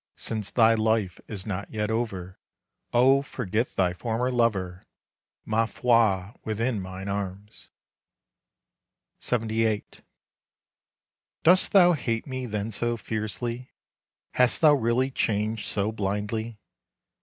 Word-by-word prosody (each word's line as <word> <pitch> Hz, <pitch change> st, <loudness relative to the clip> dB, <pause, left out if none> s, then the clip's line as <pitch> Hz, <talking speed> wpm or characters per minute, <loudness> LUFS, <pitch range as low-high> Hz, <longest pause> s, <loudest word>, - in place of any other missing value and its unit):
Since 110 Hz, -3 st, -2 dB
thy 115 Hz, -1 st, +4 dB
life 110 Hz, -4 st, 0 dB
is 100 Hz, -4 st, -6 dB
not 100 Hz, -1 st, -4 dB
yet 105 Hz, 0 st, -2 dB
over, 95 Hz, -6 st, -3 dB, 0.5 s
Oh 130 Hz, +3 st, +5 dB
forget 110 Hz, -4 st, -3 dB
thy 90 Hz, -2 st, +2 dB
former 120 Hz, +6 st, -2 dB
lover, 95 Hz, -7 st, 0 dB, 0.6 s
Ma 110 Hz, +1 st, +1 dB
foi! 110 Hz, -6 st, +2 dB
within 110 Hz, 0 st, -1 dB
mine 95 Hz, +1 st, -7 dB
arms. 100 Hz, +1 st, -6 dB, 1.5 s
LXXVIII. 110 Hz, -2 st, 0 dB, 1.6 s
Dost 180 Hz, +3 st, +6 dB
thou 180 Hz, -3 st, +7 dB
hate 115 Hz, -6 st, -2 dB
me 130 Hz, -2 st, -5 dB
then 105 Hz, 0 st, -3 dB
so 120 Hz, +2 st, -1 dB
fiercely, 115 Hz, +3 st, -4 dB, 0.6 s
Hast 125 Hz, -1 st, +2 dB
thou 155 Hz, -2 st, +7 dB
really 130 Hz, 0 st, +1 dB
changed 110 Hz, -2 st, -1 dB
so 105 Hz, +1 st, 0 dB
blindly? 105 Hz, +2 st, -3 dB
110 Hz, 110 wpm, -26 LUFS, 100-120 Hz, 1.6 s, thou